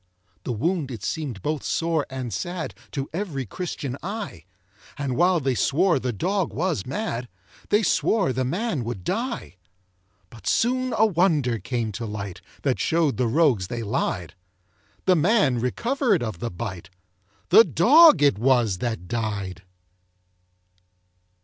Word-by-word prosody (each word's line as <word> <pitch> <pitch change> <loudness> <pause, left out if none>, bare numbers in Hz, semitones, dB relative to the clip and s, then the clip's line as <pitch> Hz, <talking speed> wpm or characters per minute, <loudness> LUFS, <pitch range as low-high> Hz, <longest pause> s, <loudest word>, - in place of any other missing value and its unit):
The - - -2
wound 155 - -1
it 115 -6 -7
seem'd 135 - -4
both 150 -1 -1
sore 165 -3 0
and 130 -4 -5
sad 175 - -4 0.2
To 140 -2 -3
every 165 -8 -3
Christian 140 - -5
eye; 195 - -6 0.5
And 140 -3 -2
while 175 +3 +3
they 135 -3 0
swore 165 +6 +2
the 125 -1 -2
dog 185 - -1
was 165 - -2
mad, 130 - -3 0.4
They 210 +2 +3
swore 195 - +2
the 130 +1 -1
man 170 - -1
would 115 -5 -5
die. 230 - -3 0.7
But 115 - -11
soon 255 +2 +1
a 220 - +5
wonder 160 - +2
came 115 -3 -2
to 115 +3 -5
light, 100 -3 -6 0.2
That 135 -3 +1
show'd 160 -4 +1
the 125 -1 +1
rogues 125 - +2
they 120 +3 -4
lied: 95 -6 -2 0.7
The 185 - +5
man 165 - +3
recover'd 225 - 0
of 110 -7 -4
the 120 - -3
bite 95 -2 -6 0.6
The 210 +6 +9
dog 275 - +6
it 140 -9 +4
was 120 -6 +2
that 110 -6 -3
died. 100 -5 -3
135 Hz, 145 wpm, -24 LUFS, 115-185 Hz, 0.7 s, The